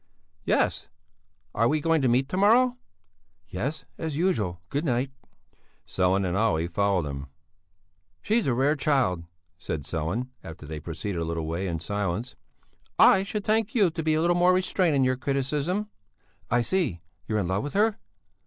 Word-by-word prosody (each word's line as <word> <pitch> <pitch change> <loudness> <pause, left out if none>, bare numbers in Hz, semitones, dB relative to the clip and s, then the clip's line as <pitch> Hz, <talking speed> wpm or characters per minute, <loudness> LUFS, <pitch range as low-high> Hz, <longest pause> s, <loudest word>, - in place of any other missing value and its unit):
"Yes; - - +1 0.7
are 115 +2 +2
we 155 +4 +1
going 165 0 +2
to 130 - +2
meet 125 +3 +2
to - - -3
morrow?" 235 +6 +4 0.7
"Yes, 130 - -4
as 160 -3 -3
usual. 110 - 0
Good 145 +3 -1
night." 130 -2 0 0.7
Sellén 95 +1 +1
and 90 - -1
Olle 100 -6 +2
followed 95 -2 +1
him. 70 0 -6 1.0
"She's 225 -3 +1
a 125 - +2
rare 140 +4 +2
child," 130 - +1 0.3
said 80 -4 -4
Sellén, 85 - -3
after 80 -2 -9
they 75 +1 -6
had 75 - -11
proceeded 85 +2 -4
a - - -1
little 80 -1 -3
way 85 +4 -2
in 85 -2 -2
silence. 100 +5 -3 0.6
"I 190 - +7
should 200 +1 -4
thank 220 +1 0
you 200 -7 +4
to 165 - -4
be 155 -1 +1
a 155 - +1
little 175 +1 +3
more 180 +1 +4
restrained 185 -3 +1
in 135 - +3
your 130 0 +1
criticism." 145 - -1 0.6
"I 120 +1 +3
see. 145 - 0 0.3
You're 110 - 0
in 100 -4 0
love 95 +2 0
with 145 - -5
her!" 210 +1 +2
130 Hz, 170 wpm, -26 LUFS, -, 1.0 s, I